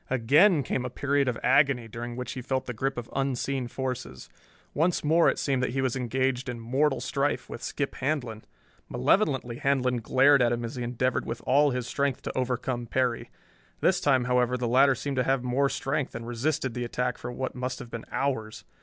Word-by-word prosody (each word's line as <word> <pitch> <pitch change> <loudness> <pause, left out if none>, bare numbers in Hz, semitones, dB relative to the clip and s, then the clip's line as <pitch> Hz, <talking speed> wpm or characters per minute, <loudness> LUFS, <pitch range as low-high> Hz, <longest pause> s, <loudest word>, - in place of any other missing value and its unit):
Again 145 - +4
came 125 +2 -2
a 125 - -3
period 140 +2 0
of 125 -3 0
agony 135 -5 +3
during 120 +2 -6
which 125 0 -5
he 130 - -5
felt 130 +1 -2
the 125 - -4
grip 135 +3 -2
of 120 -1 -5
unseen 135 -1 -1
forces. 120 - -5 0.4
Once 165 +4 +1
more 160 +3 +4
it - - -1
seemed 135 -3 0
that 125 -2 -1
he 135 - 0
was 130 -1 0
engaged 130 0 -1
in 120 -1 -5
mortal 135 +5 +1
strife 140 +1 -1
with 120 - -8
Skip 140 -1 -3
Handlon. 125 -6 -3 0.5
Malevolently 130 - +1
Handlon 130 -2 +1
glared 135 +4 +5
at 120 -1 +3
him 120 0 -1
as 115 - -6
he 125 - -5
endeavored 125 +1 -1
with 115 +1 -5
all 145 +3 +4
his 125 -2 -2
strength 140 +1 -1
to - - -5
overcome 125 -1 -2
Perry. 125 -1 -1 0.5
This - - +2
time, 130 -3 +3
however, 125 0 +1
the 125 -1 -2
latter 135 +3 +5
seemed 135 +2 -4
to 125 - +3
have 135 0 +1
more 130 +3 +1
strength 135 +1 -2
and 115 0 -5
resisted 130 +2 -1
the 125 - -3
attack 125 +1 -2
for 120 - -5
what 130 +1 -4
must 125 0 -4
have 120 - -10
been 115 - -6
hours. 110 -6 -2
130 Hz, 205 wpm, -27 LUFS, 120-135 Hz, 0.5 s, glared